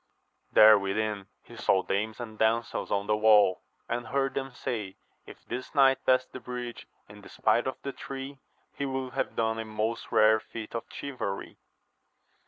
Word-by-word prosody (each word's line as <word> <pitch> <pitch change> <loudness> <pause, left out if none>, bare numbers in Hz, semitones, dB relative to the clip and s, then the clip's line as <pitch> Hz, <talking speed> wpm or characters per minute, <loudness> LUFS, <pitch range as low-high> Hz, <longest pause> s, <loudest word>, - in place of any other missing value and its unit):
There 110 -1 +8
within 100 0 -2 0.2
he - - -14
saw 95 -1 +2
dames 105 +4 -2
and 110 -3 -8
damsels 115 +1 0
on 100 0 0
the 105 0 +2
wall, 105 -3 +5 0.3
and 120 0 -3
heard 135 0 0
them 135 0 -3
say, 105 -5 -4 0.3
if - - -13
this 130 +4 -6
knight 135 -1 +5
pass 130 0 +4
the 130 - -10
bridge 125 0 -7 0.2
in 105 0 -13
despite 110 +4 +1
of 130 - -2
the 140 - -3
three, 135 0 -7 0.3
he - - -4
will 130 -1 -3
have - - -2
done 110 0 0
a 115 - -4
most 110 +1 -3
rare 110 +1 +5
feat 110 0 -9
of 115 - -4
chivalry. 130 -8 -5
115 Hz, 170 wpm, -28 LUFS, 105-130 Hz, 0.3 s, There